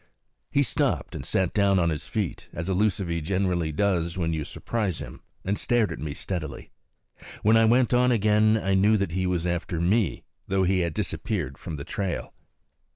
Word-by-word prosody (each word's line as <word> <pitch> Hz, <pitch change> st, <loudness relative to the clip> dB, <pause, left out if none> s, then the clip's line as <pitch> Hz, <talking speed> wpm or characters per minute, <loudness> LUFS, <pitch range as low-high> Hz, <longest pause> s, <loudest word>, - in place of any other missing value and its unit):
He 140 Hz, -, +3 dB
stopped -, -, 0 dB
and -, -, -5 dB
sat 95 Hz, -2 st, 0 dB
down 100 Hz, -2 st, +3 dB
on 85 Hz, -2 st, +2 dB
his 75 Hz, 0 st, -4 dB
feet, 105 Hz, -8 st, -3 dB
as 85 Hz, +2 st, -4 dB
a 95 Hz, -, +1 dB
lucivee 90 Hz, -4 st, 0 dB
generally 90 Hz, -1 st, 0 dB
does 85 Hz, 0 st, 0 dB
when 80 Hz, -2 st, 0 dB
you 80 Hz, -1 st, -2 dB
surprise 105 Hz, +2 st, -3 dB
him, -, -, -8 dB, 0.2 s
and 100 Hz, +2 st, -1 dB
stared 120 Hz, -4 st, +2 dB
at -, -, -5 dB
me 75 Hz, -2 st, -4 dB
steadily. 80 Hz, -8 st, -5 dB, 0.7 s
When 110 Hz, +2 st, +5 dB
I 115 Hz, 0 st, +6 dB
went 120 Hz, +2 st, +4 dB
on 125 Hz, +1 st, +4 dB
again 110 Hz, -1 st, +4 dB
I 95 Hz, -2 st, 0 dB
knew 105 Hz, +3 st, +4 dB
that 100 Hz, -4 st, -1 dB
he 95 Hz, +2 st, 0 dB
was 90 Hz, -2 st, 0 dB
after 85 Hz, 0 st, -2 dB
me, 95 Hz, +3 st, +1 dB, 0.2 s
though 95 Hz, 0 st, +1 dB
he 95 Hz, 0 st, +2 dB
had 85 Hz, -3 st, -1 dB
disappeared -, -, -3 dB
from 80 Hz, -, -6 dB
the 70 Hz, -, -6 dB
trail. 95 Hz, -3 st, -3 dB
95 Hz, 190 wpm, -26 LUFS, 85-105 Hz, 0.7 s, I